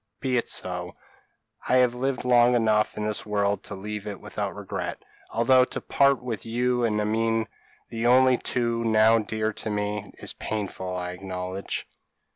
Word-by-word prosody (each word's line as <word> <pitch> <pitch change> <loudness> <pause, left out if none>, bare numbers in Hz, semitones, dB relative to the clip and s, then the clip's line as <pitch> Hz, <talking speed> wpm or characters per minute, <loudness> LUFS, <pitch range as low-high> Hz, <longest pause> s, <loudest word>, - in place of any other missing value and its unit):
Be 130 -2 0
it 120 - +1
so. 90 -1 -3 0.7
I 125 - +4
have 125 -1 +4
lived 130 +1 -2
long 120 0 +5
enough 110 -2 +2
in 105 - -2
this 105 -1 -2
world 100 -1 0
to 100 - -5
leave 105 +1 -6
it 100 -2 -5
without - - -4
regret; - - -4 0.3
although 125 +3 +4
to - - -4
part 140 -2 +2
with 115 -4 -4
you 125 +2 0
and 105 -2 +1
Amine, 115 +1 +1 0.4
the 115 +1 -1
only 130 0 +5
two 115 -1 -1
now 110 0 +5
dear 110 0 -2
to 110 - -5
me, 105 0 -2
is - - -6
painful, 95 -3 -4
I 90 0 -3
acknowledge." 90 +1 -5
110 Hz, 165 wpm, -26 LUFS, 105-120 Hz, 0.7 s, long